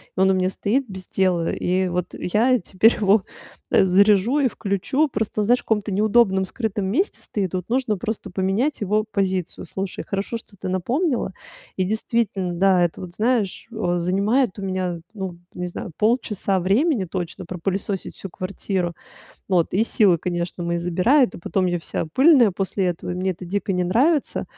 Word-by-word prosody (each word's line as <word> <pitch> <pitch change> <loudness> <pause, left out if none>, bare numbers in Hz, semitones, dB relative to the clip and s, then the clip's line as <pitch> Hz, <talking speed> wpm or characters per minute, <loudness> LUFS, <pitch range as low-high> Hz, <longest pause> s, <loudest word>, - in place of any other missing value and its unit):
и - - -4
он 190 0 +5
у - - +4
меня 185 0 +1
стоит 245 +8 0
без 190 -2 -9
дела, 180 -3 +1
и 185 +1 0
вот 180 0 -3
я 240 +7 +2
теперь 200 +5 +3
его 200 -1 +4 0.5
заряжу 200 +7 +4
и 275 - +3
включу. 225 +8 0
Просто, 215 -2 -2
знаешь, 245 +4 +3
в - - -13
каком-то 210 -2 0
неудобном, 200 -1 +3
скрытом 205 -1 -3
месте 280 - 0
стоит, 195 -4 -3
вот, 180 -1 -3
нужно 240 -3 0
просто 215 0 -4
поменять 195 +11 0
его 210 +1 +1
позицию. 190 -3 -2
Слушай, 195 -1 -5
хорошо, 200 +4 -2
что 220 - -16
ты 190 -1 -5
напомнила, 240 - 0 0.4
и, 190 - +2
действительно, 205 -2 -1
да, 185 +1 +3
это, 165 - -5
вот 175 -1 -9
знаешь, 225 -3 0
о 180 -6 -1
занимает 200 +6 +1
у - - -5
меня, 185 -3 -2
ну, 190 -5 -5 0.2
не 180 - -4
знаю, 175 0 -7
полчаса 210 -4 +1
времени 225 - +2
точно. 180 +1 -5
Пропылесосить 190 +2 -3
всю 195 - -8
квартиру, 185 -1 -3 0.6
вот, 175 -4 +2
и 195 - +3
силы, 205 -6 +3
конечно, 175 +1 -3
мои 170 0 -1
забирает, 180 - +2
и - - -7
потом 185 +2 -1
я 175 -1 0
вся 165 - -4
пыльная 265 -6 +6
после 190 0 -1
этого, 175 0 -3
мне 185 +2 -1
это 185 0 -7
дико 200 +2 -1
не 180 -1 0
нравится, 270 - +1
195 Hz, 175 wpm, -22 LUFS, 180-220 Hz, 0.6 s, пыльная